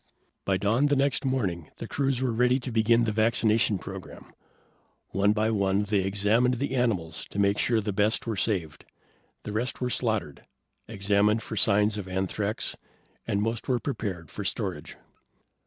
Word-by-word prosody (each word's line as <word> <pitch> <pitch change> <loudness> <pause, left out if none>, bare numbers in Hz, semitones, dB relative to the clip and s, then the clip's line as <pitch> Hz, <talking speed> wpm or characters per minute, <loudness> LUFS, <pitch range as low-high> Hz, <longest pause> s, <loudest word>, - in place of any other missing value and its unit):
By 95 -1 +2
dawn 110 +9 +2
the 145 - +2
next 140 0 +1
morning 100 - -1
the - - -6
crews 135 -2 0
were 130 - +1
ready 125 +3 +3
to 125 - -5
begin 115 +1 +3
the 110 - 0
vaccination 110 -1 +2
program. 95 0 -10 0.8
One 100 +2 +2
by 110 +1 +1
one, 100 -1 +1
they 105 0 +1
examined 105 +6 +2
the 135 +2 -2
animals 100 -11 0
to - - -10
make 100 0 +2
sure 115 -2 +2
the 105 -1 -3
best 105 +3 +1
were 115 -2 -2
saved. 90 -7 -2 0.6
The 105 - -5
rest 115 +4 -2
were 125 -1 -1
slaughtered, 110 - -2 0.4
examined 105 +1 +1
for - - -6
signs 105 0 +3
of 95 - -6
anthrax, 95 +3 -1 0.5
and 100 +1 0
most 115 0 -3
were 125 - +2
prepared 100 - -4
for - - -5
storage. - - -3
105 Hz, 165 wpm, -27 LUFS, 100-120 Hz, 0.8 s, ready